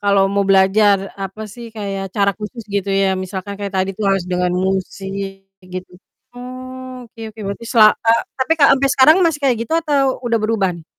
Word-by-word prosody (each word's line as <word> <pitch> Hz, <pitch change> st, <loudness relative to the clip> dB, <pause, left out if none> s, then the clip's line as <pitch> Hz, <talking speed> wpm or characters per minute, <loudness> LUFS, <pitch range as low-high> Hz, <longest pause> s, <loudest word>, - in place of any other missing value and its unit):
kalau 200 Hz, -1 st, +3 dB
mau 200 Hz, 0 st, +1 dB
belajar 195 Hz, +2 st, +5 dB, 0.2 s
apa 195 Hz, +2 st, -6 dB
sih, 235 Hz, +3 st, -10 dB
kayak 195 Hz, -2 st, -4 dB
cara 200 Hz, -1 st, +3 dB
khusus 225 Hz, +3 st, -7 dB
gitu 200 Hz, -1 st, -2 dB
ya, 195 Hz, 0 st, +2 dB, 0.2 s
misalkan 190 Hz, +2 st, -6 dB
kayak 200 Hz, -1 st, -5 dB
tadi 190 Hz, +1 st, -1 dB
tuh 215 Hz, -, -3 dB
harus 195 Hz, -2 st, +1 dB
dengan 180 Hz, 0 st, +1 dB, 0.2 s
musik 195 Hz, +1 st, -4 dB, 0.2 s
gitu. 185 Hz, 0 st, -8 dB, 0.5 s
Oh, 255 Hz, 0 st, -8 dB
oke 230 Hz, -, -16 dB
oke 220 Hz, -, -12 dB
berarti 200 Hz, +3 st, -6 dB
sela 225 Hz, -3 st, +7 dB
e 225 Hz, -, +2 dB, 0.3 s
tapi 260 Hz, +5 st, +1 dB
Kak, 280 Hz, -, +7 dB
ampe 275 Hz, +1 st, +1 dB
sekarang 285 Hz, +5 st, +6 dB
masih 325 Hz, -3 st, +1 dB
kayak 265 Hz, -4 st, +2 dB
gitu 235 Hz, -, -7 dB
atau 280 Hz, -4 st, +1 dB
udah 235 Hz, -2 st, 0 dB
beruban? 195 Hz, -6 st, -1 dB
205 Hz, 185 wpm, -18 LUFS, 195-245 Hz, 0.5 s, sela